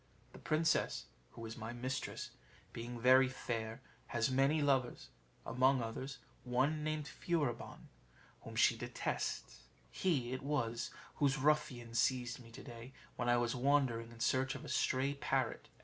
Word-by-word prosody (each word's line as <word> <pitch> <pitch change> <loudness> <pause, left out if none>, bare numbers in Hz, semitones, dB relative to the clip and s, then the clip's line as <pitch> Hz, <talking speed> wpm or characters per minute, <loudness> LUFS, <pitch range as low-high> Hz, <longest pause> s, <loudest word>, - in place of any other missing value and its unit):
The - - -11
princess, 155 +1 +1 0.3
who 115 - -7
is 110 0 -6
my 115 +1 -5
mistress, 130 +2 -3 0.4
being 120 +1 -5
very 130 +2 +7
fair, 115 -2 -4 0.3
has 115 +1 +1
many 135 +4 +3
lovers 135 -4 +1 0.4
among 130 +2 +3
others, 130 +4 -5 0.3
one 130 +5 +1
named 155 -1 -1
Furibon, 150 -9 -2 0.5
whom - - -9
she - - +5
detests: - - -3 0.3
he 135 -10 0
it 130 - -3
was 120 -5 -1 0.3
whose 140 -1 +3
ruffians 130 -5 +1
seized 125 0 +1
me 115 -2 -13
to 120 +4 -10
day 120 0 -9 0.2
when 120 0 -1
I 120 - +5
was 120 -1 +1
wandering 125 -3 +2
in 115 - -13
search 130 +2 +2
of - - -7
a - - -7
stray 135 +2 +1
parrot. 140 - -1
130 Hz, 150 wpm, -36 LUFS, 120-140 Hz, 0.5 s, very